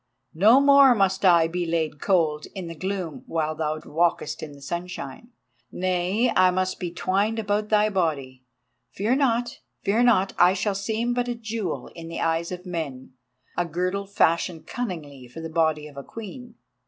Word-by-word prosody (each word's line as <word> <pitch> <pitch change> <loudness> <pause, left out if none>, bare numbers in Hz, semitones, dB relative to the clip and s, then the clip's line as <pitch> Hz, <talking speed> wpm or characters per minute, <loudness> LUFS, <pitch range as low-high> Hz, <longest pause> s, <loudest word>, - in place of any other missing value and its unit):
No 215 +10 +6
more 280 -2 +7
must 195 -2 +1
I 170 -3 +6
be 175 +2 -2
laid 160 -3 -1
cold 160 -6 +1
in 190 -2 -5
the 165 - -6
gloom 185 -1 -4
while 155 -1 -1
thou 155 0 -2
walkest 165 0 0
in 155 - -7
the 140 - -14
sunshine—nay, 175 - -3
I 185 0 +6
must 185 +1 -1
be 175 - -3
twined 200 +5 0
about 210 -1 -1
thy 210 0 +4
body. 145 -9 -2 0.5
Fear 225 +7 +1
not, 240 -3 0 0.2
fear 215 +4 +2
not, 220 -6 +3
I 180 +2 +6
shall 205 +1 0
seem 220 +5 -1
but 245 0 -1
a 240 - -2
jewel 225 -3 -4
in 165 -1 -9
the 165 - -5
eyes 165 +1 0
of 180 0 -7
men, 155 -8 -5 0.4
a 175 - +1
girdle 185 +4 -2
fashioned 170 -3 +1
cunningly 155 - -6
for 125 +7 -10
the 165 0 -6
body 160 -2 +1
of 145 -2 -15
a 140 - -6
queen. 230 - -9
180 Hz, 170 wpm, -25 LUFS, 160-210 Hz, 0.5 s, more